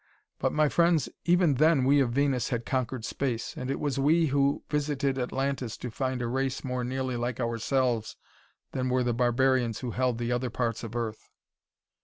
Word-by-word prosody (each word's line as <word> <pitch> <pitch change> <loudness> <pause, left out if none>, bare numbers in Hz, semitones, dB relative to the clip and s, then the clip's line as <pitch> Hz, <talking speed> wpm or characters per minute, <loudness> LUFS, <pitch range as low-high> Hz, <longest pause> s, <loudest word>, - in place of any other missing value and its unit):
But, - - +1
my 155 0 +3
friends, 170 0 +2 0.2
even 175 -3 +4
then 155 -4 +5
we 140 +2 +5
of 130 -3 +2
Venus 135 -1 +1
had 120 -1 -2
conquered 130 -3 -2
space, 125 -4 -2
and 130 - -5
it 135 - -1
was 140 -2 -1
we 160 +4 +4
who 140 -1 +1
visited 140 -2 -1
Atlantis 130 -1 -2
to 125 - -6
find 130 +1 -2
a - - -1
race 130 +2 -1
more 125 -1 -2
nearly 130 0 -2
like 120 0 -3
ourselves 120 0 0 0.6
than 130 -1 -1
were 125 0 +2
the 120 -1 0
barbarians 125 -1 +2
who 125 - -3
held 125 0 0
the 120 0 -2
other 125 +1 0
parts 115 -1 -2
of 115 0 -7
Earth. 115 -2 -4
130 Hz, 185 wpm, -28 LUFS, 120-140 Hz, 0.6 s, then